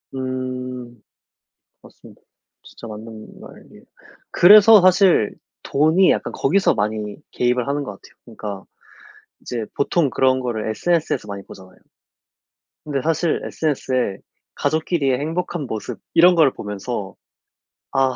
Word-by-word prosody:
음. 130 -2 -5 0.8
맞습니다. - - -17 0.4
진짜 - - -13
맞는 110 0 -11
말이에요. - - -15 0.5
그래서 210 +3 +8
사실 185 - +4 0.3
돈이 160 +6 +3
약간 - - -1
거기서 190 +8 +2
많이 105 0 -3 0.2
개입을 125 0 0
하는 145 +1 -1
것 115 - -6
같아요. 100 - -17
그러니까 105 -4 -8 0.8
이제 120 -2 -5
보통 145 0 +1
그런 130 0 +2
거를 120 -4 -3
SNS에서 165 +1 -1
많이 100 -1 -6
보잖아요. 95 -1 -14 1.1
근데 140 -3 -3
사실 165 +2 0
SNS에 130 -9 -2 0.4
가족끼리의 145 -3 0
행복한 165 +2 -3
모습 110 -2 -6
이런 175 +2 +6
걸 155 -5 +4
보면서 105 0 -6 0.8
'아 135 -1 +1
130 Hz, 280 characters per minute, -20 LUFS, 110-160 Hz, 1.1 s, 그래서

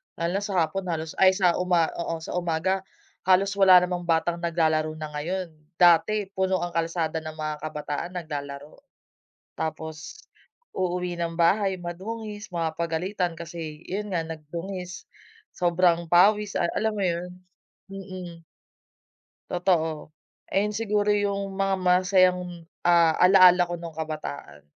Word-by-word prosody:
Lalo 170 +1 -2
na - - -6
sa 190 -4 +1
hapon 185 +4 -5
halos 160 -2 -3
ay 190 0 +6
sa 180 -3 +2
uma 175 -3 +2
oo 170 -1 -3
sa - - -6
umaga 175 +3 0 0.5
halos 190 +1 +4
wala 185 -2 +8
namang 180 -1 -3
batang 170 +1 +1
naglalaro 160 -2 0
na 155 -1 -7
ngayon, 170 +4 -3 0.2
dati 185 +4 +4
puno 190 -2 0
ang 175 - -3
kalsada 165 -1 -1
ng 155 0 -8
mga 155 -1 -3
kabataan 150 +3 -5
naglalaro. 145 -3 -6 0.8
Tapos, 160 - -6 0.6
uuwi 180 -1 -2
ng 170 -1 -3
bahay 190 +2 +2
madungis, 205 +4 -6
mapapagalitan 170 +2 -2
kasi 165 -2 -7
yun 205 +1 -4
nga 170 - +1
nagdungis, 180 +4 -7 0.5
sobrang 170 -1 +2
pawis 205 +3 +4
ay 170 - +1
alam 220 0 +1
mo 200 - -2
yun? 175 0 -2 0.6
Mm. 185 -4 -9 1.1
Totoo. 165 -4 0 0.4
Ayan 205 +2 +2
siguro 210 -2 +1
yung 200 -1 -1
mga 195 0 +1
masasayang 180 0 +3 0.4
ah, 170 -2 +5
alaala 180 -1 +7
ko 175 - -4
nung 170 -2 -8
kabataan. 75 - -6
175 Hz, 130 wpm, -25 LUFS, 160-190 Hz, 1.1 s, wala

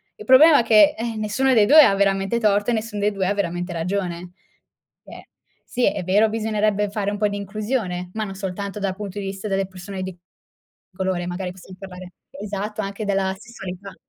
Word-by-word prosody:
Il 210 - -11
problema 285 +5 +7
è - - -4
che, 215 -3 +5
eh, 230 0 -3
nessuno 215 +5 +1
dei 215 -3 +5
2 305 +3 +9
ha 200 - +4
veramente 195 +3 +1
torto, 205 +1 +2
e - - +1
nessun 220 -1 -3
dei 205 +1 +1
2 190 -2 -2
ha 200 - +1
veramente 175 -2 -2
ragione. 175 0 -3 0.7
Eh, - - -13 0.4
sì, 245 - -1
è - - -1
vero, 205 +5 +3
bisognerebbe 215 -2 0
fare 205 -1 -2
un 205 - -4
po' 210 - +3
di 205 0 -4
inclusione, 200 -3 -3
ma 220 0 -2
non 195 -2 -5
soltanto 200 +1 -5
dal 195 -2 -2
punto 205 -1 -6
di 200 - -5
vista 195 +2 -5
delle 195 -1 -1
persone 190 0 -8
di 185 -1 -7 0.8
colore, 185 -2 -2
magari 180 0 -4
possiam 185 0 -13
parlare 185 -1 -10 0.3
esatto, 210 +1 -4
anche 200 +2 -5
della 195 -1 0
sessualità. 195 -4 -9
200 Hz, 195 wpm, -22 LUFS, 190-215 Hz, 0.8 s, 2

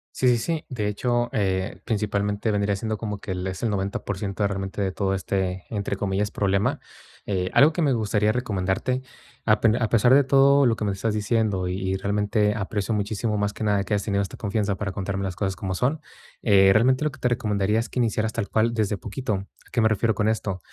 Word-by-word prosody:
Sí, 130 - +1
sí, 120 -1 +5
sí. 160 +6 -2
De 115 -6 -2
hecho, 120 +3 0
eh, 95 -2 -1
principalmente, 105 0 -1
vendría 100 -1 +1
siendo 110 +2 -3
como 105 -1 -4
que 100 - -6
el 90 0 -3
es 95 -1 -5
el 115 - +1
90% 100 0 -2
de - - +4
realmente, 95 0 -4
de 95 -1 0
todo 95 0 -1
este, 95 -1 -2
entre 100 -2 -3
comillas, 100 +1 -1
problema. 100 -1 0 0.5
Eh, 90 -2 -1
algo 155 +3 +6
que 170 - 0
me 140 -3 +3
gustaría 105 -2 +1
recomendarte, 115 +2 -1 0.4
a 105 -1 +4
pen 110 -1 +3
a 115 - +2
pesar 120 +3 +4
de 140 - +6
todo 140 +1 +5
lo 115 -2 +3
que 110 - -4
me 100 - +1
estás 105 +3 -2
diciendo, 105 -3 0
y 95 +1 -2
y - - 0
realmente, 105 +1 +1
aprecio 105 0 -2
muchísimo, 105 +1 -1
más 105 0 -1
que - - -6
nada, 105 -2 +2
que 95 - -3
hayas 100 -1 +1
tenido 100 -2 0
esta 95 - -7
confianza 105 -2 -1
para 100 +1 -3
contarme 95 0 -3
las 95 -2 -3
cosas 95 -1 -2
como 95 -1 -3
son, 140 - 0 0.4
eh, 95 -3 +5
realmente, 130 +7 +3
lo 150 - 0
que 150 - -14
te 125 - +1
recomendaría 105 -3 0
es 115 - -2
que 125 - -4
iniciaras 110 -2 0
tal 115 -3 -3
cual 115 +1 +2
desde 105 -3 0
poquito. 110 +5 -4
¿A 95 +1 -10
qué 120 - +1
me 110 - +5
refiero 110 0 +1
con 105 +1 +1
esto? 105 -4 -1
105 Hz, 225 wpm, -24 LUFS, 100-115 Hz, 0.5 s, algo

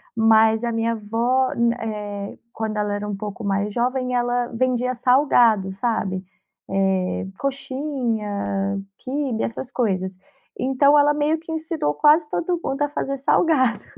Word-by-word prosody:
Mas 220 0 +4
a 235 - 0
minha 230 0 0
avó 230 +4 0
nã 235 0 +2
eh, 205 -2 -5 0.2
quando 220 -1 -3
ela 210 -1 0
era 205 0 -3
um 205 - -2
pouco 210 +2 -6
mais 200 +1 -1
jovem 250 +1 -1
ela 245 0 0
vendia 250 +1 0
salgado, 240 -6 +3
sabe. 195 -3 -2 0.5
Eh, 190 -1 0
coxinha, 230 -8 -2 0.2
quibe, 265 -3 -2
essas 245 +3 -5
coisas. 190 -6 -1 0.4
Então, 280 +3 +4
ela 290 0 +5
meio 300 +2 +1
que 325 0 -9
ensinou 320 - -2
quase 300 - +4
todo 345 +2 -1
mundo 275 +2 -1
a 290 - 0
fazer 275 -1 -3
salgado. 265 -4 +2
235 Hz, 140 wpm, -22 LUFS, 210-270 Hz, 0.5 s, ela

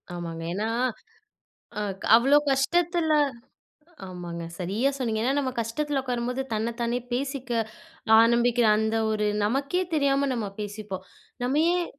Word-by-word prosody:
ஆமாங்க. 165 -1 -5
ஏன்னா, 210 +4 -1 1.1
அ - - -1 0.4
அவ்ளோ 270 +5 +5
கஷ்டத்துல 330 +4 +2 0.9
ஆமாங்க. 175 -2 -7 0.2
சரியா 200 +9 0
சொன்னீங்க. 230 -5 -1
ஏன்னா 260 - +2
நம்ம 270 -2 0
கஷ்டத்துல 275 +5 -1
உட்காரும்போது 250 0 -2
தன்ன 220 +2 -1
தானே 235 +1 0
பேசிக்க 265 0 -3 0.7
ஆரம்பிக்குற 235 +1 +3
அந்த 220 +1 0 0.2
ஒரு 210 -1 0 0.2
நமக்கே 275 - 0
தெரியாம 280 -2 +2
நம்ம 230 -4 -2
பேசிப்போம். 205 -2 -6 0.4
நம்ம 265 +5 +1
ஏன் 355 -1 +1
240 Hz, 120 wpm, -26 LUFS, 215-275 Hz, 1.1 s, அவ்ளோ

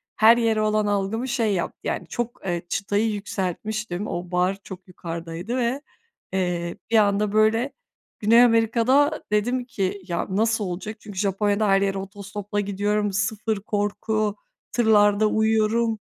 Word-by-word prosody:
her 225 +2 +6
yere 225 -2 +2
olan 215 0 +1
algımı 205 +4 -1
şey 235 -5 +1
yaptı, 180 - -3
yani - - -3
çok, 240 -3 -5
ııı, 175 -1 -1
çıtayı 205 +2 0
yükseltmiştim, 205 0 -3
o 175 +1 -5
bar 180 +2 +1
çok 190 0 -10
yukarıdaydı 170 +5 -5
ve, 250 +3 0 0.5
eee, 175 -2 -1
bir 230 - +5
anda, 205 -1 +3
böyle, 220 +5 +2 0.5
Güney 230 +3 +6
Amerika'da 245 +6 +3
dedim 245 +4 +1
ki 200 -4 -3
"Ya, 170 -2 -2
nasıl 220 +3 +1
olacak?" 195 +4 -5
Çünkü 205 -2 -11
Japonya'da 205 +1 +1
her 195 0 +4
yere 195 0 0
otostopla 200 +1 -5
gidiyorum, 205 +1 0
sıfır 215 +1 -1
korku, 210 +1 -1 0.4
tırlarda 215 -2 +4
uyuyorum. 220 +1 +1
210 Hz, 140 wpm, -24 LUFS, 195-225 Hz, 0.5 s, her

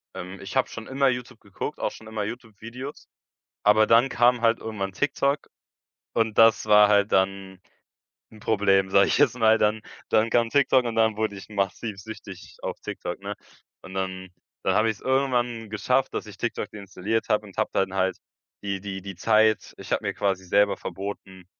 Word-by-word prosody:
Ähm, 90 +2 -7
ich 95 - -8
habe 130 - +2
schon 115 0 -8
immer 135 0 +2
YouTube 125 -1 -5
geguckt, 100 -2 -6
auch - - -1
schon 110 - -13
immer 110 -1 -3
YouTube-Videos, 115 +4 -8 0.6
aber 105 +1 +5
dann 120 +4 +5
kam 120 0 +3
halt 115 0 +3
irgendwann 100 -3 -4
TikTok 140 +4 0 0.7
und 110 -2 0
das 115 -1 +6
war 105 -1 +7
halt 100 0 +3
dann 95 0 0 0.7
'n 110 - -14
Problem, 100 -3 +2
sage 100 0 +5
ich - - +1
jetzt 135 -4 +3
mal, 110 0 +5
dann 105 0 +1 0.3
dann 110 +1 +3
kam 115 0 +2
TikTok 130 -1 +3
und 115 -1 -3
dann 110 -1 +3
wurde 110 -2 -1
ich 95 - -11
massiv 100 +1 -2
süchtig 95 -3 -10
auf - - -5
TikTok, - - -5
ne? - - -5 0.5
Und 95 - -11
dann 95 0 -4 0.3
dann - - +1
habe 110 +1 +3
ich's 110 - -11
irgendwann 125 -4 0
geschafft, 125 +5 0
dass - - -4
ich - - -11
TikTok - - -3
deinstalliert 105 +2 -3
habe 105 0 +1
und 95 - -16
habe - - +1
dann 95 -1 0
halt 95 0 0 0.5
die 100 -1 -3
die 95 -1 -6
die 95 -1 -8
Zeit 110 +2 +2
ich - - -10
habe - - 0
mir - - -1
quasi 95 -2 -1
selber 100 +2 +3
verboten, 95 -2 -7
110 Hz, 185 wpm, -25 LUFS, 95-115 Hz, 0.7 s, war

